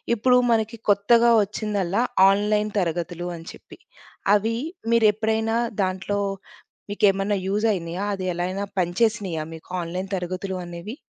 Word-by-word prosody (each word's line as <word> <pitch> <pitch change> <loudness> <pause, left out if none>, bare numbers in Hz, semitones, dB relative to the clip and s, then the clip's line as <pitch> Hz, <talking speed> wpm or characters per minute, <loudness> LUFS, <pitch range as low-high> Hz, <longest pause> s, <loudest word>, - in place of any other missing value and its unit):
ఇప్పుడు 250 +3 +4
మనకి 225 0 0
కొత్తగా 230 +4 +4
ఒచ్చిందల్లా, 205 -1 -1 0.3
ఆన్‌లైన్ 210 +1 +1
తరగతులు 175 0 -2
అని 165 +1 -12
చెప్పి. - - -15 0.6
అవి 225 +2 0 0.4
మీరెప్పుడైనా 220 0 +2 0.3
దాంట్లో 190 +2 -2 0.7
మీకేమన్నా 200 0 +2
యూజైనియా? 195 -4 -1
అదెలా 180 -2 -2
అయినా 195 +2 -3
పనిచేసినాయా 185 -2 0
మీకు, 160 - -12
ఆన్‌లైన్ 180 +3 -5
తరగతులు 185 +1 -4
అనేవి? 175 +6 -7
200 Hz, 110 wpm, -24 LUFS, 180-215 Hz, 0.7 s, ఇప్పుడు